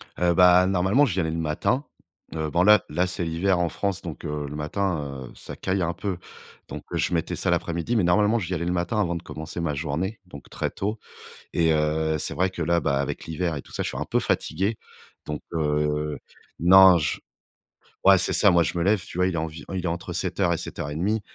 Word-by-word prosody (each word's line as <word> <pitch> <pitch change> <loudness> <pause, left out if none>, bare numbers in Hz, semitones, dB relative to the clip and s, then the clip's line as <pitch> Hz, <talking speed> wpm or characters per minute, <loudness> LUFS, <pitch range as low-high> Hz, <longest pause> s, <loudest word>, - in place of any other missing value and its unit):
Heu, 90 -1 +2
bah 90 +1 +6
normalement, 95 +9 +3
j'y 95 -8 -1
allais 80 -3 0
le 80 - -3
matin. 80 - 0 0.5
Heu, 80 -1 -2
bon 85 +3 +2
là 105 +2 +6
là 90 +1 0
c'est 90 -1 -3
l'hiver 85 +3 +1
en 85 -1 +1
France 100 0 -2
donc, 85 -1 -8
heu, 75 -1 -3
le 75 - -7
matin, 75 -4 -3
heu, - - -14
ça - - -9
caille 95 0 -1
un 85 0 0
peu. 95 +1 -4 0.5
Donc, - - -7
heu, - - 0
je - - 0
mettais 80 -2 -1
ça - - -1
l'après-midi. 85 +8 -1
Mais 110 - +3
normalement, 105 +6 +3
j'y 90 -3 -4
allais 85 -1 -2
le 90 - 0
matin 90 +5 -1
avant 85 -4 0
de 85 - -6
commencer 80 +2 -7
ma 85 -3 -1
journée, 80 +8 -3
donc 70 -6 -12
très - - -2
tôt. 105 +3 -3 0.5
Et 80 -1 +3
heu, 80 0 +1
c'est - - -4
vrai 90 +5 +1
que 85 - -5
là, 85 +1 +2
bah 70 -3 0
avec 70 - -4
l'hiver 85 +1 -2
et 70 - -5
tout - - -17
ça - - -2
je - - -2
suis - - -5
un - - -2
peu - - +1
fatigué. 105 +4 -1 0.5
Donc, 75 0 -5
heu, 75 -1 0 0.4
non 95 +1 +8
j 75 -2 -2 0.9
ouais 95 0 +8
c'est 90 - +1
ça 100 - +5
moi 85 -1 +4
je 90 - -2
me 85 - +1
lève 100 +1 +3
tu - - -9
vois, 90 0 +3
il 95 - -1
est - - -1
envi 80 0 -4
il 90 -1 -3
est - - +1
entre 85 +1 -4
07:00 95 0 0
et - - -1
07:30. 85 +11 -2
85 Hz, 235 wpm, -25 LUFS, 80-95 Hz, 0.9 s, non